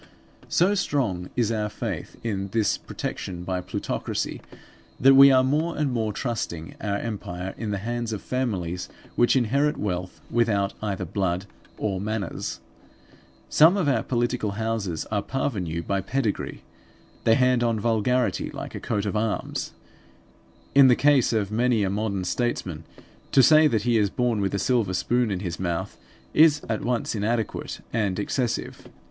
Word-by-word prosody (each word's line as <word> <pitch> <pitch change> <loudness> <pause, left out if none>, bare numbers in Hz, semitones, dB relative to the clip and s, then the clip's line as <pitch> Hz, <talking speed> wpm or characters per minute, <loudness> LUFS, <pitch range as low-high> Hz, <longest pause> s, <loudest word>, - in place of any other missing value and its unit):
So 185 +4 +3
strong 125 - -1
is 115 -3 +1
our 105 -1 -1
faith - - -5
in 100 -4 -2
this 105 +1 +1
protection 90 -2 -5
by 90 0 -2
plutocracy, 90 - -3 0.6
that 135 +1 +7
we 135 +1 +9
are 130 -1 +5
more 155 +6 0
and 150 -3 0
more 110 -3 -1
trusting 100 -9 -4
our 100 -1 -1
empire 95 -4 -5
in 110 - -4
the 100 - -1
hands 120 +3 -3
of 105 - -5
families 90 -9 -2 0.3
which 120 - +4
inherit 140 +4 +2
wealth 90 -2 -3
without 105 -4 +1
either 100 -3 -2
blood 95 0 -1 0.3
or 95 -3 -2
manners. 105 -3 -3 0.9
Some 160 - +6
of 180 -7 +1
our 135 - +2
political 120 -4 -1
houses 105 -6 -2
are 105 -2 +1
parvenue 95 - -2
by 100 +2 -1
pedigree; 110 +1 -2 0.6
they 115 - +6
hand 125 -1 +3
on 115 -2 +1
vulgarity 120 +3 +1
like - - -7
a - - -5
coat 105 0 -2
of 100 - -2
arms. 105 0 -2 1.0
In 140 -1 +8
the 125 - +6
case 140 -2 +4
of 105 -3 0
many 115 -1 +2
a 95 - 0
modern 100 -2 -1
statesman 90 -7 -2 0.5
to 135 - +6
say 155 +3 +7
that 110 -7 0
he 120 -1 +3
is 105 -1 +2
born 120 -1 0
with 100 0 0
a - - +1
silver 105 -3 +1
spoon 120 +4 +1
in 95 -3 -2
his 85 -4 -4
mouth, 85 -2 -2 0.4
is 150 -2 +5
at 110 -1 -1
once 120 -1 -1
inadequate 110 +1 -2
and 105 -5 0
excessive. 120 +3 -2
110 Hz, 160 wpm, -25 LUFS, 100-125 Hz, 1.0 s, we